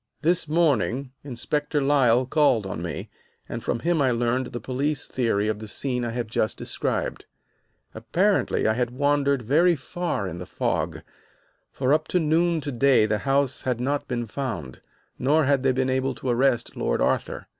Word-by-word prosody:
"This 170 +1 +2
morning, 140 -5 +1
Inspector 145 +3 -2
Lyle 130 -3 +3
called 130 -6 +2
on 95 - -5
me, - - -5 0.4
and - - -6
from 115 - -2
him 170 -2 +1
I 135 - +3
learned 120 +1 0
the 120 -1 -6
police 140 +4 -2
theory 115 -5 0
of 110 -1 -1
the 110 - -8
scene 125 +2 -2
I 120 - -2
have 120 +1 -3
just 110 0 -1
described. - - -3 0.7
"Apparently 175 - +1
I 110 - +3
had 120 +1 0
wandered 140 0 +1
very 165 +9 +4
far 165 - -3
in 85 -1 -6
the 90 - -7
fog, - - -2 0.7
for 130 +1 +1
up 155 +1 +1
to 180 - +1
noon 165 +1 +2
to 145 - -4
day 130 -2 +4
the 110 0 0
house 135 +2 0
had 125 -3 -1
not 140 +3 -1
been 120 -2 -2
found, 110 - -5 0.4
nor 150 +5 +3
had 140 -1 +2
they 135 0 +3
been 130 0 0
able 130 0 0
to 125 +2 -4
arrest 120 -1 +1
Lord - - -1
Arthur. - - -1
130 Hz, 175 wpm, -25 LUFS, 120-145 Hz, 0.7 s, very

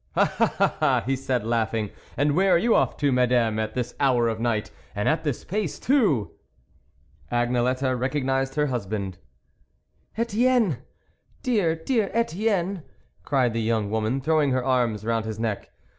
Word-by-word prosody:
" - - -32
Ah! - - +1 0.2
ah! - - +3
" - - -14
he 135 +2 +1
said, 130 -4 -2
laughing, 110 -2 -1
" - - -25
and 145 +1 +2
where 190 +2 +3
are - - +6
you 230 +6 +2
off - - +2
to, 145 -1 +1
Madame, 125 -3 +2
at 110 0 -3
this 125 -1 -2
hour 125 -4 +3
of 110 - -2
the - - -8
night, 115 -3 -1 0.2
and 105 - -1
at 160 0 +1
this 145 -6 -2
pace 200 -4 -3
too? 210 - +2 0.5
" - - -34
Agnelette 125 +2 +1
recognised 135 0 -1
her 150 -1 +2
husband. 100 -7 -3 0.5
" - - -38
Etienne! 230 - +2 0.7
dear, 205 -11 +2
dear 205 +5 0
Etienne," 200 -4 0 0.4
cried 130 -5 +1
the 115 - -1
young 110 -2 0
woman, 110 +4 0
throwing 155 0 +2
her 130 -1 0
arms 120 -5 +1
round 115 -1 0
his 110 -1 -4
neck. 110 -3 -3
130 Hz, 175 wpm, -25 LUFS, 115-160 Hz, 0.7 s, are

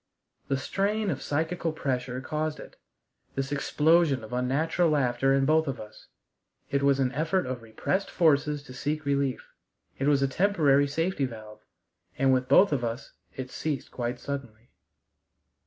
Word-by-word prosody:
The 135 - 0
strain 200 +8 -1
of 135 - -4
psychical 165 +3 -1
pressure 125 -4 -2
caused 155 +3 -3
it - - -11 0.6
this 135 0 -2
explosion 150 -1 +2
of 110 - -9
unnatural 150 +7 +1
laughter 135 -3 +2
in 135 0 +2
both 160 +2 +3
of 135 - -3
us; 110 0 -12 0.6
it 140 0 +1
was 140 -1 +3
an 130 -2 +1
effort 165 +6 0
of 125 -1 -4
repressed 115 - -2
forces 150 -3 +2
to 130 - -11
seek 150 +4 -3
relief; 140 -2 -1 0.5
it 135 - 0
was 140 -2 +3
a - - +3
temporary 145 -4 +3
safety 165 +1 0
valve. 110 -3 -9 0.6
And 135 0 +4
with 130 0 +1
both 195 - +6
of 130 -4 0
us 120 +3 -4 0.2
it 130 -1 -6
ceased 150 -4 -3
quite 120 0 -3
suddenly. 125 -5 -7
140 Hz, 155 wpm, -27 LUFS, 130-155 Hz, 0.6 s, both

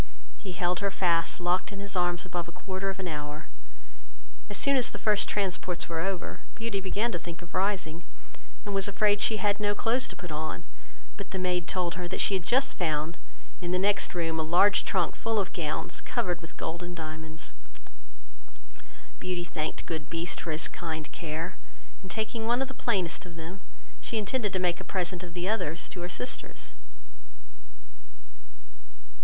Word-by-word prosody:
He 190 -3 -5
held 175 0 +1
her 200 - +2
fast 170 -4 +3
locked 180 +3 +2
in 200 - -6
his 200 -1 -2
arms 175 0 +2
above 175 -2 -2
a - - -7
quarter 190 +2 -3
of 195 - -3
an 190 -2 -2
hour. 150 -1 -4 1.0
As - - 0
soon 280 0 +5
as 255 -3 +5
the - - -5
first 210 -2 +3
transports 185 -3 +1
were 165 -1 -1
over, 190 +1 -1 0.2
Beauty 225 -3 -1
began 205 +5 +1
to 175 - -1
think 170 +1 -7
of 170 - -13
rising, 185 -4 +1 0.6
and 205 - -2
was 195 0 +3
afraid 205 +1 +3
she 220 - +4
had 205 -1 +2
no 205 -1 +2
clothes 240 +5 +3
to 190 - -6
put 175 -2 -7
on; 155 +1 -2 0.5
but 200 - -6
the 190 - -3
maid 180 -2 +1
told 180 -2 +1
her, 175 - -2
that 180 - -3
she - - +6
had 190 - +2
just 265 +10 +3
found, 155 -1 +1 0.5
in 175 - -2
the 180 - +3
next 200 0 +3
room, 165 -2 +1
a - - +3
large 175 +6 +6
trunk 185 -4 +2
full 225 -1 0
of 195 -2 +1
gowns, 170 +1 -1
covered 175 -2 0
with 165 0 -11
gold 165 +2 -3
and 175 0 -5
diamonds. 160 0 -5 1.7
Beauty 180 -1 -1
thanked 155 -3 -3
good 160 -3 -3
Beast 170 +1 -2
for - - -4
his 155 0 +1
kind 160 -3 -4
care, 165 +2 -3 0.4
and 190 - -9
taking 220 +4 -1
one 240 +1 +4
of - - -4
the 265 - -7
plainest 180 -9 +1
of 170 - -10
them, 165 +4 -7 0.4
she 225 - -2
intended 215 0 +1
to 185 - +1
make 180 -2 +2
a - - -5
present 180 -2 -1
of 175 -1 -8
the 175 +1 -1
others 170 -7 0
to 180 - -6
her 175 - -3
sisters. 125 -3 -5
180 Hz, 185 wpm, -30 LUFS, 165-200 Hz, 1.7 s, she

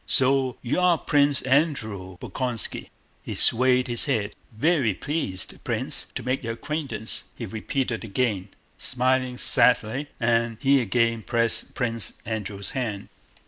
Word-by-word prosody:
So 130 -1 +2
you 130 +7 0
are 180 -2 +4
Pwince 145 -2 +2
Andwew 110 - 0
Bolkónski?" 125 +3 -3 0.3
He - - -6
swayed 125 +1 +4
his 120 -1 +1
head. 110 -7 -1 0.2
"Vewy 140 - +2
pleased, 100 - -3
Pwince, - - -2
to - - -3
make 130 +1 -1
your 115 0 -2
acquaintance!" 140 -3 -3
he 115 - -5
repeated 115 +3 -2
again, 105 -3 -1 0.3
smiling 130 0 0
sadly, 125 +3 +3
and 115 -1 +1
he 140 -1 +4
again 115 0 +1
pressed 115 +1 0
Prince 115 -3 -1
Andrew's 105 -3 -4
hand. 110 -6 -3
120 Hz, 130 wpm, -25 LUFS, 110-135 Hz, 0.3 s, are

